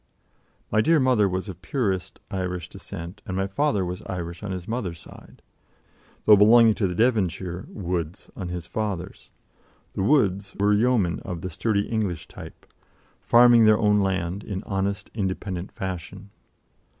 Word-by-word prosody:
My 110 - +4
dear 165 +7 +4
mother 125 -7 +3
was 95 +2 -3
of 90 -2 -8
purest 95 - -2
Irish 90 -2 -3
descent, 85 +5 -9
and 95 - -3
my 95 - +1
father 100 0 0
was 90 +1 -5
Irish 85 -1 -5
on 105 - -5
his 90 -2 -5
mother's 105 -8 -3
side, - - -15 0.8
though 105 - +9
belonging 110 +2 +6
to 100 -2 0
the 90 - -4
Devonshire 95 -5 0
Woods 90 -2 -4
on 95 - -5
his 90 -2 -5
father's. 100 -4 -4 0.6
The - - -3
Woods 100 -5 +2
were 105 +1 +3
yeomen 105 -5 +2
of 85 -2 -6
the 95 - -5
sturdy 100 +4 0
English 105 -8 -2
type, - - -12 0.6
farming 120 -1 +6
their 110 0 +6
own 105 -1 +3
land 95 0 -1
in 100 0 -5
honest, 100 0 -3
independent 95 -3 -3
fashion. 95 +2 -6
95 Hz, 150 wpm, -25 LUFS, 90-110 Hz, 0.8 s, though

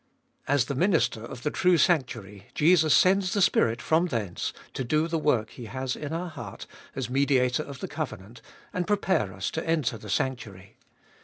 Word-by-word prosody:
As 145 -3 +3
the 140 - -3
Minister 165 - +1
of 120 +1 -9
the 150 - 0
true 180 -2 +3
sanctuary 120 - 0
Jesus 160 -1 +5
sends 185 0 +3
the 205 - +1
Spirit 120 -8 +2
from 160 +8 +2
thence 110 - -3 0.2
to 130 - -3
do 155 +6 +1
the 165 -1 -1
work 120 -8 +1
He 120 - -9
has 130 +2 -3
in 145 -1 -6
our 170 +2 -3
heart 120 -10 -8 0.3
as 130 -2 -2
Mediator 130 0 +2
of 140 -3 -9
the - - -3
covenant, 120 -7 -6 0.3
and 180 -1 -2
prepare 190 - +1
us 95 +1 -4
to 160 - -3
enter 140 -9 0
the 105 - -10
sanctuary. 100 -5 -3
135 Hz, 180 wpm, -27 LUFS, 115-160 Hz, 0.3 s, Jesus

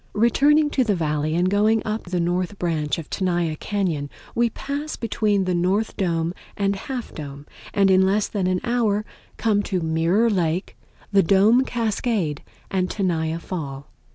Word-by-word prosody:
Returning 290 +7 +4
to 260 - +2
the 210 -4 +1
Valley, 155 -1 -1
and 175 +2 +2
going 210 +3 +3
up 215 +1 -3
the 180 0 -2
north 180 +3 -1
branch 160 -5 -1
of 160 -3 -6
Tenaya 175 -4 0
Cañon, 170 -6 -2 0.2
we 235 0 +2
pass 285 +6 -4
between 210 -3 0
the 185 -1 0
North 185 +5 0
Dome 170 -2 0 0.2
and 200 -1 +1
Half 245 +4 -6
Dome, 145 -1 -8 0.3
and 195 -1 +3
in 185 0 +5
less 195 +2 +2
than 195 -4 -1
an 185 0 0
hour 220 -4 +1 0.3
come 210 -3 +2
to 190 -2 -2
Mirror 165 +8 +2
Lake, 175 -1 -1 0.4
the 200 -1 +5
Dome 200 +8 +5
Cascade 220 - -1 0.3
and 185 -1 0
Tenaya 165 -5 -1
Fall. 145 -6 -6
190 Hz, 160 wpm, -23 LUFS, 170-215 Hz, 0.4 s, in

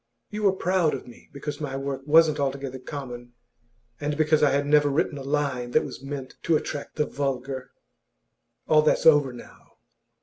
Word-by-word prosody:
You 210 - -4
were 200 -2 +4
proud 180 -5 +1
of 130 - -8
me 120 - -15
because 145 +2 -6
my 135 -2 -3
work 135 0 -4
wasn't 155 0 +5
altogether 135 -1 -2
common, 125 -3 -8 0.7
and 145 0 -2
because 155 -1 +3
I 150 - +5
had 140 +1 +1
never 145 0 +4
written 145 0 0
a - - -7
line 135 -3 -1
that - - +3
was - - -8
meant 135 -1 -7
to 165 - +2
attract 145 -1 -6
the 150 - +1
vulgar. 135 -2 -3 1.0
All 155 -1 +5
that's 150 - +2
over 145 -4 +6
now. 120 - -14
145 Hz, 175 wpm, -25 LUFS, 135-150 Hz, 1.0 s, over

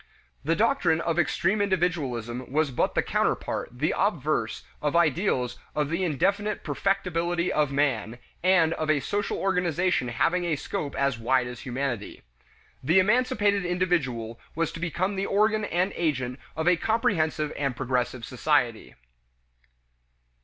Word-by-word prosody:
The 165 +4 +1
doctrine 205 -7 +2
of 170 0 0
extreme 190 +5 +1
individualism 135 - -1
was 150 0 +1
but 120 - 0
the - - +2
counterpart, - - -1
the - - -1
obverse, - - 0 0.2
of 150 +1 0
ideals 155 - +1 0.2
of 150 -1 0
the 170 +3 0
indefinite 200 +6 0
perfectibility 175 -3 0
of 150 -2 +1
man 125 -6 0 0.2
and 175 -3 +4
of 155 -1 -3
a 155 -2 +4
social 205 +8 -2
organization 180 -6 +1
having 170 +9 +1
a 170 -3 0
scope 140 0 -4
as 140 -3 0
wide 125 +2 +2
as 125 0 -7
humanity. 130 -5 -4 0.6
The 160 +8 +3
emancipated 210 -1 +3
individual 155 -11 -1 0.2
was 165 0 0
to - - -8
become 175 +4 -1
the 195 - -1
organ 215 +1 +2
and 185 +1 0
agent 130 -6 -1 0.2
of 160 +2 -2
a 180 -1 +5
comprehensive 160 -8 0
and 140 -3 -1
progressive 125 -1 -1
society. 125 -3 0
165 Hz, 140 wpm, -26 LUFS, 130-185 Hz, 0.6 s, a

